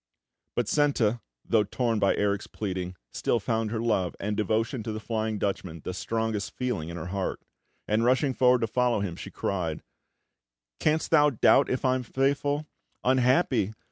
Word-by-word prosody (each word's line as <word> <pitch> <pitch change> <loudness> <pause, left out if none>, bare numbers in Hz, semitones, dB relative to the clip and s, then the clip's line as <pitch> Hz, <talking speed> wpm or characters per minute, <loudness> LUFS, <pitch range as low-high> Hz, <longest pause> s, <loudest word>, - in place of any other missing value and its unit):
But 120 -3 0
Senta, 120 -6 +2 0.2
though 110 -2 +3
torn 115 +1 -1
by 100 -1 +3
Erik's 100 0 0
pleading, 90 -3 -4 0.2
still 120 - 0
found 110 +1 -1
her 110 +1 -2
love 105 -6 0
and 105 +1 -2
devotion 110 +4 0
to 110 - -4
the 110 - -4
Flying 110 -1 -2
Dutchman 95 -5 -3
the 90 - -4
strongest 110 +2 -2
feeling 125 -11 -2
in 85 - -6
her 85 +1 -5
heart; 95 -1 -2 0.5
and, 110 +2 +2
rushing 130 +3 +3
forward 125 -1 +4
to 115 - +1
follow 120 -1 +1
him, 90 -4 -3
she - - -8
cried: 85 -5 -3 1.0
"Canst 155 +1 +1
thou 150 -2 +6
doubt 125 - +4
if 130 +1 -1
I 130 - +4
am 130 - 0
faithful? 140 +4 0 0.4
Unhappy! 125 - +3
110 Hz, 170 wpm, -27 LUFS, 100-125 Hz, 1.0 s, thou